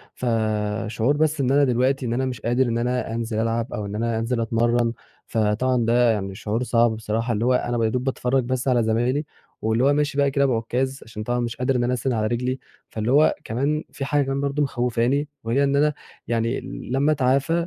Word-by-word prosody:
فشعور 110 +2 0
بس 155 -1 +1
إن 130 -1 +1
أنا 145 +1 +4
دلوقتي 130 +1 +1
إن 115 - -1
أنا 130 +2 0
مش 125 -4 -4
قادر 120 +3 +2
إن 115 -1 0
أنا 125 -1 -1
أنزل 115 -1 -2
ألعب 115 +1 -1
أو 105 - -3
إن 100 +1 -5
أنا 115 +1 -1
أنزل 115 +1 -1
اتمرن 115 +1 +1 0.3
فطبعًا 115 +3 +1
ده 120 +1 +4
يعني 100 -3 -3
شعور 110 +3 -2
صعب 120 -1 +3
بصراحة 110 +2 -2
اللي 110 +2 -1
هو 125 - +3
أنا 120 -1 0
ب 115 - 0
يا 110 - +2
دوب 125 +2 -1
باتفرج 130 -1 0
بس 130 +1 -2
على 125 -3 +3
زمايلي، 120 +7 +1 0.4
واللي 110 +3 +1
هو 140 +2 +4
ماشي 150 -1 0
بقى 140 -1 +3
كده 140 0 +2
بعكاز 130 +2 -1
عشان 110 -1 -7
طبعًا 120 +2 -1
مش 120 -1 -2
قادر 130 +1 0
إن 120 - +1
أنا 125 +1 +1
أسنِد 125 +1 -1
على 110 -2 0
رجلي 125 +3 -1 0.3
فاللي 110 +2 -2
هو 150 +3 +5
كمان 140 +7 -1
في 135 - -5
حاجة 145 +1 +2
كمان 135 +1 -2
برضه 140 +1 0
مخوفاني، 125 +2 0 0.2
وهي 120 +5 +1
إن 140 0 +2
أنا 150 +1 +3 0.3
يعني 115 +2 0 0.3
لمّا 140 +4 +2
اتعافى 140 +2 +2
120 Hz, 215 wpm, -23 LUFS, 115-135 Hz, 0.4 s, هو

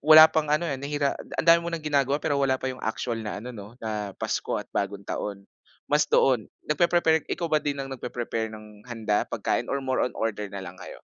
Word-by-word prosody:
wala 155 0 +10
pang 155 -1 -1
ano 155 +3 +2
eh, 150 - -1
nahira 140 +1 -1 0.2
ang - - 0
dami 170 0 +7
mo 170 - -3
nang 165 - -2
ginagawa 140 -2 +2
pero 150 -1 0
wala 130 -1 +2
pa - - -4
yung 130 -1 -4
actual 115 +1 -2
na 105 -1 -4
ano 125 +4 -7
'no, 110 +3 -10
na 105 -2 -3
Pasko - - -1
at - - -7
Bagong 100 0 -2
Taon, 100 -1 -4 0.4
mas - - +2
doon. 125 -5 +3 0.2
Nagpe-prepare 160 0 +3
ikaw 170 - -1
ba 155 -1 +2
din 140 -1 -2
ang 135 - -3
nagpe-prepare 120 -3 -3
ng 105 -1 -12
handa, 110 -3 0
pagkain, - - -1
or 140 - 0
more 130 -1 0
on 125 - +1
order 105 -2 -2
nalang 95 -2 -7
kayo? 90 - -9
130 Hz, 215 wpm, -26 LUFS, 110-150 Hz, 0.4 s, wala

